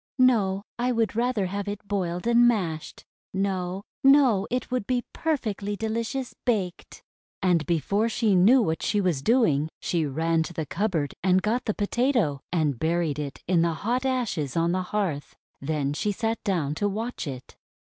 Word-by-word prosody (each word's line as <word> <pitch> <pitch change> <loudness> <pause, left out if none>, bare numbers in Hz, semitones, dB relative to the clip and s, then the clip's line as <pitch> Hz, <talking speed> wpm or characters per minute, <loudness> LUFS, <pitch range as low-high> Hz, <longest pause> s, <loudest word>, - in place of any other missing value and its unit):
:'No! 210 -7 +3 0.2
I 250 +1 +1
would 225 -3 0
rather 235 -3 +1
have 200 +2 -4
it 205 0 -5
boiled 180 -3 -2
and 235 0 +5
mashed! 175 -9 -2 0.3
No! 190 -1 -1 0.2
No! 270 -8 +5
It 250 -1 -2
would 250 -5 -1
be 250 -1 0
perfectly 215 -10 -2
de 220 +2 -3
licious 230 +3 -3
baked!' 195 -7 -2 0.4
And 175 -4 +3
before 200 +7 +1
she 220 -2 +1
knew 220 +8 +6
what 160 -4 -1
she 210 - +1
was 180 -8 0
doing, 160 - +3
she 165 -4 0
ran 165 +4 +1
to 160 - -4
the 160 -1 -3
cupboard 165 -4 -1
and 185 0 +3
got 235 +4 0
the 215 - -1
Potato, 215 - +1
and 155 -8 0
buried 160 -1 0
it 145 -2 -6
in 175 -2 +3
the 170 -1 +1
hot 240 +9 -1
ashes 230 - -1
on 165 +1 +2
the 185 +1 0
hearth. 180 -7 -3 0.3
Then 145 -1 -1
she 205 +7 -1
sat 225 +2 -2
down 170 -8 0
to 205 - +2
watch 225 -1 -4
it. 130 -3 -8
195 Hz, 175 wpm, -26 LUFS, 165-230 Hz, 0.4 s, knew